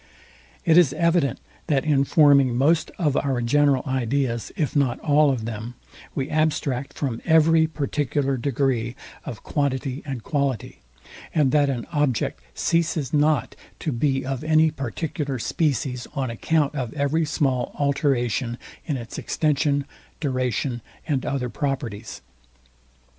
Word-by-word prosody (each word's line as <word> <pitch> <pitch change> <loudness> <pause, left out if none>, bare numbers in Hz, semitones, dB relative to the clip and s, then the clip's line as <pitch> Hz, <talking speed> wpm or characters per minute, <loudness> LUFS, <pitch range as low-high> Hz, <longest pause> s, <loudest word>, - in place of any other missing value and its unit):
] - - -28
It 165 0 +7
is 150 -7 +4
evident, 170 -2 +1 0.3
that 145 -4 +1
in 140 -3 +3
forming 140 -5 +5
most 155 +5 +3
of 150 -5 +1
our 135 -3 0
general 140 +2 +3
ideas, 130 -2 -1
if 155 -2 -1
not 135 -4 +2
all 150 -1 +4
of 125 -5 -1
them, 115 +2 -6 0.4
we 135 -1 -1
abstract 145 -4 0
from 125 -6 -3
every 160 0 +5
particular 145 -2 -1
degree 125 -2 0 0.3
of 115 - -7
quantity 135 -2 -1
and 135 -6 -5
quality, 140 -5 -2 0.6
and 145 -5 +3
that 145 -2 +3
an 120 -4 -2
object 145 -7 0
ceases 165 -4 0
not 150 -2 +2 0.2
to 155 - -3
be 135 +2 0
of 135 +1 -3
any 155 0 +4
particular 140 +1 -3
species 130 -1 -1
on 130 -4 -1
account 150 +5 +1
of 130 -6 -3
every 150 +3 +1
small 135 -5 0
alteration 130 -4 0 0.3
in 145 -4 -1
its 120 -2 -7
extension, 145 -2 +1 0.3
duration 130 -3 -1 0.3
and 140 -5 -1
other 135 -3 -1
properties. 120 -3 -4
140 Hz, 135 wpm, -24 LUFS, 125-150 Hz, 0.6 s, It